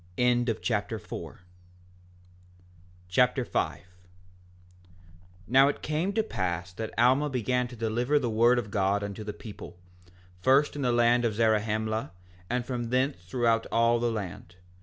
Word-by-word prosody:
Alma 120 -1 +2
Chapter 105 0 -2
5 - - -8 1.7
5:1 125 +6 +1 1.7
Now 135 +4 +6
it 145 - -3
came 155 +6 -1
to 220 +1 +1
pass 90 - -3
that 110 +3 -5
Alma 130 +5 +4
began 125 -1 0
to 125 - -11
deliver 120 +5 0
the 130 - 0
word 120 +2 +4
of 110 -4 -3
God 100 0 +1
unto 100 +1 -5
the 105 - -4
people, 105 -4 -10 0.6
first 135 +9 +3
in 145 - -4
the 125 -2 +1
land 120 0 +3
of 115 -3 0
Zarahemla, 110 -3 0 0.4
and 120 0 -1
from 120 -2 -3
thence 130 +4 0
throughout 115 +2 +1
all 115 +1 +3
the 120 0 0
land. 95 -4 -6
120 Hz, 140 wpm, -28 LUFS, 110-125 Hz, 1.7 s, Now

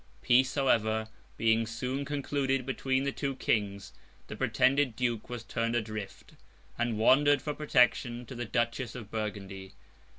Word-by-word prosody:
Peace, 130 +2 +4
however, 110 -5 +1 0.3
being 115 0 +2
soon 125 +5 -3
concluded 140 -2 -1
between 135 0 0
the 140 - 0
two 140 0 -3
Kings, 100 -5 -1 0.3
the - - -7
pretended 130 -1 +2
Duke 120 -2 -2
was 120 -2 -5
turned 115 0 -2
adrift, 110 -3 -5 0.4
and 120 -2 -1
wandered 145 +6 +5
for 150 - -3
protection 125 -4 +2
to 120 - -9
the 120 -1 -4
Duchess 120 +1 -1
of 110 -4 -9
Burgundy. 100 -3 -5
120 Hz, 140 wpm, -30 LUFS, 110-135 Hz, 0.4 s, wandered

